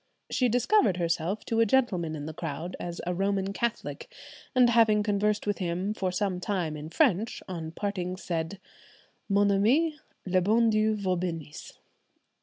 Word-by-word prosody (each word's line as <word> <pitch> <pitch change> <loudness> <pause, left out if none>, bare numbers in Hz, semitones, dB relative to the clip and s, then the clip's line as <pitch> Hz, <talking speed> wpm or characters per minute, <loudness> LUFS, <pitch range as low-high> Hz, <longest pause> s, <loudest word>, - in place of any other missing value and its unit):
She 250 -2 +2
discovered 245 - +3
herself 170 +3 -1
to 225 - 0
a 230 - +5
gentleman 190 -10 +1
in 145 -1 -6
the 155 - -6
crowd 165 +2 -5
as 175 -1 -5
a 180 - -1
Roman 195 +1 0
Catholic, 235 +2 -3 0.4
and 250 -1 +6
having 220 -3 +4
conversed 210 0 0
with 205 -1 -1
him 180 +3 -1
for 190 -3 -2
some 185 -1 -1
time 180 -5 -2
in 150 +1 -7
French, 220 - +1
on 165 -4 -5
parting 185 -1 -3
said, 170 +1 -3 0.7
"Mon 200 0 +3
ami, 285 +11 +2 0.3
le 185 -1 +2
bon 225 +4 +3
Dieu 215 0 +2
vous 190 -3 -1
benisse." 165 -4 -5
195 Hz, 160 wpm, -28 LUFS, 175-215 Hz, 0.7 s, and